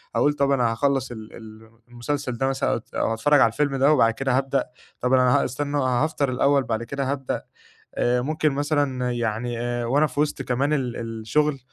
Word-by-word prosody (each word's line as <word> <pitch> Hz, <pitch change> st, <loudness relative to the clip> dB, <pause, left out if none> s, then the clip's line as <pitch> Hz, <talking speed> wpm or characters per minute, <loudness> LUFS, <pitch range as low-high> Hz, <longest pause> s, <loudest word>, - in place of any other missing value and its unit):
أقول: 145 Hz, -, +3 dB
"طب، 140 Hz, -1 st, +1 dB
أنا 125 Hz, -4 st, +2 dB
هاخلِّص 135 Hz, +2 st, 0 dB
ال 110 Hz, -2 st, -9 dB
ال 110 Hz, 0 st, -12 dB, 0.2 s
المسلسل 125 Hz, +2 st, -3 dB
ده 135 Hz, -, 0 dB
مثلًا، 135 Hz, -3 st, 0 dB
أو -, -, 0 dB
هاتفرَّج 145 Hz, +6 st, +3 dB
على -, -, +7 dB
الفيلم 145 Hz, +3 st, 0 dB
ده، 135 Hz, +2 st, +4 dB
وبعد 115 Hz, -6 st, +4 dB
كده 130 Hz, +1 st, 0 dB
هابدأ. 135 Hz, 0 st, 0 dB, 0.4 s
طب 125 Hz, +1 st, +1 dB
أنا 125 Hz, -1 st, +4 dB
هاستنى، 140 Hz, +3 st, -3 dB
أنا 140 Hz, -, +1 dB
هافطر 140 Hz, +3 st, 0 dB
الأوِّل 140 Hz, +2 st, +2 dB
وبعد 115 Hz, -2 st, -2 dB
كده 135 Hz, +2 st, -3 dB
هابدأ." 135 Hz, -2 st, -3 dB, 0.5 s
آآ، 125 Hz, 0 st, +1 dB
ممكن 155 Hz, +3 st, 0 dB
مثلًا 140 Hz, -3 st, 0 dB
يعني 120 Hz, 0 st, -2 dB
آآ، 120 Hz, 0 st, -2 dB
وأنا 145 Hz, +6 st, +2 dB
في 135 Hz, +1 st, -7 dB
وسط 150 Hz, -2 st, 0 dB
كمان 135 Hz, +3 st, 0 dB
ال 130 Hz, -5 st, -1 dB
الشغل، 115 Hz, +6 st, -1 dB
130 Hz, 190 wpm, -24 LUFS, 120-140 Hz, 0.5 s, على